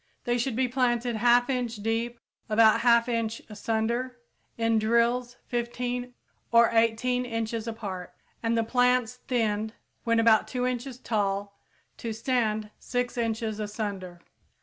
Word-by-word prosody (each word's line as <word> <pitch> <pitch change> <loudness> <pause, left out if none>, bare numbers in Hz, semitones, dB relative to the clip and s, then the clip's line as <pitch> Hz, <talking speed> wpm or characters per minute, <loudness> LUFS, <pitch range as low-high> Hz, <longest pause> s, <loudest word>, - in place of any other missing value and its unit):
They 240 0 0
should 240 0 -1
be 255 +1 +2
planted 240 -2 0
1/2 245 +2 +4
inch 245 -2 -1
deep, 225 +3 -2 0.3
about 220 0 +5
1/2 235 -1 +4
inch 230 -1 -1
asunder, 230 +4 -2 0.4
in 225 -1 +2
drills 235 +2 +1
15 245 +1 -3 0.4
or 235 0 +6
18 230 +2 +2
inches 230 -1 -3
apart, 200 -6 -5 0.3
and 230 0 +1
the 230 - +2
plants 250 +1 +2
thinned 220 -3 0 0.3
when 230 -1 +2
about 225 -1 +5
2 250 -1 -2
inches 250 0 -3
tall 200 -4 -1 0.4
to 230 -1 -4
stand 220 -2 -1
6 245 -1 -2
inches 225 -2 -2
asunder. 200 -4 -5
230 Hz, 130 wpm, -27 LUFS, 220-245 Hz, 0.4 s, or